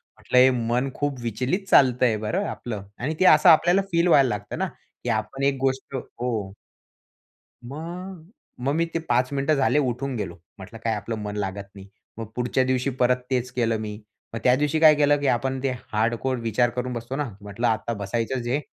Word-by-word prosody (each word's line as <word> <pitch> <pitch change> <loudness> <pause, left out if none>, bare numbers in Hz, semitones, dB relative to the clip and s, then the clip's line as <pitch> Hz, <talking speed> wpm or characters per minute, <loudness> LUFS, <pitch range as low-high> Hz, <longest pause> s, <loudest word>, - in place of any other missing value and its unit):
म्हटलं 125 - -1
हे 130 +1 +8 0.2
मन 125 +3 +1
खूप 145 -3 -2
विचलित 125 - -2
चालतंय 125 -4 +4
बरं 105 0 -2
आपलं 105 -5 -6
आणि 150 +6 -3
ते 185 - +3
असं 155 0 +7
आपल्याला 175 +4 +5
फील 170 +1 +2
व्हायला 140 -6 +5
लागतं 105 -2 -4
ना. - - 0 0.4
की - - -3
आपण 135 - -2
एक 140 0 +2
गोष्ट 135 0 -1
हो. 115 -6 -4 1.2
मग 170 +4 -8 0.3
मग 140 - +1
मी 165 +1 +2
ते 165 - 0
5 125 +2 +2
मिनिटं 140 +2 +1
झाले 140 +2 +2
उठून 130 0 -2
गेलो. 100 -6 -4 0.2
म्हटलं 100 +4 -11
काय 115 - +1
आपलं 115 +2 -4
मन 105 0 -5
लागत 100 0 -4
नाही. 100 -1 -11 0.3
मग 115 - -5
पुढच्या 125 +1 +1
दिवशी 130 +1 0
परत 125 +1 +4
तेच 125 -1 -1
केलं 115 -2 0
मी. 105 -1 -6 0.3
मग 115 - -3
त्या 125 0 +5
दिवशी 150 +3 0
काय 155 -1 +7
केलं 145 0 +3
की 145 - -1
आपण 130 +1 0
ते 135 - +1 0.2
हार्डकोर 115 +4 0
विचार 115 +1 +1
करून 125 +1 -4
बसतोना 125 +3 -4
म्हटलं 105 +4 -2
आता 115 +1 -1
बसायचंच 115 +4 -3
आहे 135 +4 +1
125 Hz, 190 wpm, -24 LUFS, 115-140 Hz, 1.2 s, हे